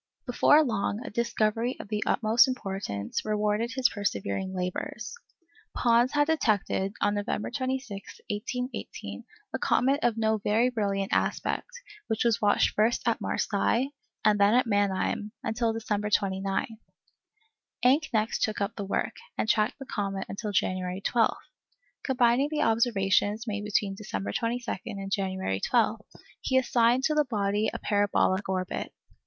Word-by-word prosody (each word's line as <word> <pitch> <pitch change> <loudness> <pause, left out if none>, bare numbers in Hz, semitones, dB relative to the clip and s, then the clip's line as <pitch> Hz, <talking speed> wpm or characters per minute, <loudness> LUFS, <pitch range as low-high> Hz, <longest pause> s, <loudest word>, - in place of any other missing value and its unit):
Before 295 +4 +5
long 220 -2 -2
a - - -6
discovery 230 +1 0
of - - -9
the 210 -1 -1
utmost 225 +3 +4
importance 195 - -3
rewarded 210 +2 0
his 260 -2 +4
persevering 190 - -2
labours. 185 +3 -4 0.6
Pons 240 +1 +3
had 290 0 +4
detected 210 -10 +1
on 205 - +2
November 205 0 -2
26, 255 -6 -4
1818, 250 +5 -5 0.3
a - - -2
comet 270 +3 +2
of 235 -2 +1
no 220 -1 +1
very 220 +5 +2
brilliant 200 -4 -1
aspect, - - 0 0.4
which 220 - 0
was 235 -3 +2
watched 205 -1 +3
first 225 +3 +1
at 230 - +1
Marseilles, 230 +6 0 0.3
and 210 -1 +4
then 205 +3 +5
at 255 +1 +4
Mannheim, 205 0 0
until 230 0 0
December 215 -2 -2
29. 195 +2 -1 1.1
Encke 285 +5 +4
next 220 -1 0
took 215 - 0
up 200 +1 -2
the 205 - -4
work, 195 - -2 0.2
and - - 0
tracked 215 -1 +2
the 270 - -8
comet 195 -4 -3
until 210 +1 -4
January 185 -1 -1
12. 225 +2 +2 0.7
Combining 255 +1 +3
the 305 -1 0
observations 220 -1 +2
made 205 -2 -3
between 205 -1 0
December 100 - -4
22 235 - -2
and 195 -1 -5
January 190 - -1
12, 225 - +1 0.4
he 260 - +1
assigned 245 0 +3
to 305 - +2
the 300 -1 +3
body 210 -2 0
a - - -4
parabolic 205 -1 +1
orbit. 185 -1 -2
215 Hz, 145 wpm, -28 LUFS, 200-240 Hz, 1.1 s, Before